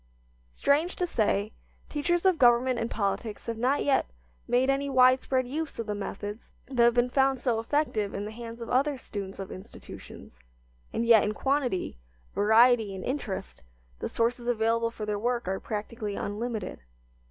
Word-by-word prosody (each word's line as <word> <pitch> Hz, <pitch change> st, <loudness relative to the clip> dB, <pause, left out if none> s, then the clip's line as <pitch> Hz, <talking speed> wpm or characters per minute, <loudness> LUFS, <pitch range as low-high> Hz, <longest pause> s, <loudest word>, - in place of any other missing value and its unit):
Strange 295 Hz, -, +1 dB
to 360 Hz, -, 0 dB
say, 215 Hz, -, 0 dB, 0.3 s
teachers 345 Hz, +4 st, 0 dB
of 370 Hz, -3 st, +4 dB
government 245 Hz, 0 st, +4 dB
and 230 Hz, -, -2 dB
politics 205 Hz, +1 st, -2 dB
have 230 Hz, -1 st, -4 dB
not 260 Hz, +4 st, +2 dB
yet 275 Hz, -2 st, +2 dB, 0.4 s
made 250 Hz, +2 st, +3 dB
any 275 Hz, +1 st, +1 dB
widespread 255 Hz, 0 st, +4 dB
use 305 Hz, +3 st, -4 dB
of 230 Hz, -, -3 dB
the 210 Hz, -, -2 dB
methods 205 Hz, +1 st, -6 dB, 0.2 s
that 255 Hz, -2 st, -1 dB
have 235 Hz, 0 st, +5 dB
been 245 Hz, 0 st, +2 dB
found 270 Hz, -1 st, +3 dB
so 235 Hz, -3 st, 0 dB
effective 225 Hz, -5 st, 0 dB
in 205 Hz, -, -3 dB
the 210 Hz, -, -6 dB
hands 230 Hz, +1 st, -8 dB
of -, -, -9 dB
other 275 Hz, +2 st, +2 dB
students 200 Hz, -5 st, -7 dB
of 195 Hz, -1 st, -7 dB
institutions, 125 Hz, -, -11 dB, 0.5 s
and 230 Hz, -, -1 dB
yet 230 Hz, -2 st, +7 dB
in 215 Hz, -, -1 dB
quantity, 255 Hz, -, -1 dB, 0.3 s
variety 220 Hz, -1 st, +4 dB
and 185 Hz, -, -6 dB
interest 205 Hz, -, -4 dB, 0.4 s
the -, -, -3 dB
sources 235 Hz, +1 st, -1 dB
available 230 Hz, 0 st, +1 dB
for 220 Hz, -2 st, -6 dB
their 210 Hz, -1 st, -2 dB
work 240 Hz, -1 st, -1 dB
are 190 Hz, +1 st, -1 dB
practically 210 Hz, -1 st, -4 dB
unlimited. 215 Hz, 0 st, -4 dB
235 Hz, 165 wpm, -28 LUFS, 210-260 Hz, 0.5 s, yet